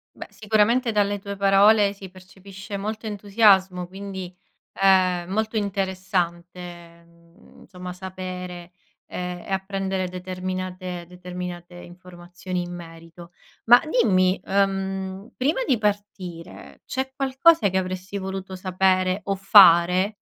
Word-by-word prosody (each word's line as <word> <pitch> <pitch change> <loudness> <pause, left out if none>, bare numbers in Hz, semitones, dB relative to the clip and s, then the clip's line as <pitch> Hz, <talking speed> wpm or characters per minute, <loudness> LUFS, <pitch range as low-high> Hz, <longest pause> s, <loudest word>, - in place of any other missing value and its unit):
Beh, - - -9
sicuramente 220 +3 +1
dalle 205 -1 +1
tue 200 +1 -6
parole 200 +1 +4
si 195 -1 -11
percepisce 190 +2 -11
molto 215 +3 -5
entusiasmo, 200 -3 +2
quindi, 190 -1 -8 0.5
ehm, 185 -2 +3
molto 220 +3 -1
interessante, 180 -3 -4
mhmm, 170 0 -22
insomma 180 -1 -9
sapere, 180 -1 -7 0.3
ehm, 180 0 -5
e - - -9
apprendere 190 -1 -2
determinate 185 -1 -5
determinate 180 -1 -8
informazioni 175 0 -7
in 175 0 -8
merito. 165 0 -12 0.3
Ma 240 +2 +8
dimmi, 195 -10 +2
uhm, 195 0 -2
prima 285 - 0
di 260 -5 +3
partire 200 -5 -5
c'è 265 +1 -3
qualcosa 275 0 +3
che 190 - -1
avresti 185 +1 -4
voluto 190 0 -6
sapere 185 +1 +1
o 195 - -1
fare? 190 0 +6
190 Hz, 110 wpm, -23 LUFS, 180-200 Hz, 0.5 s, Ma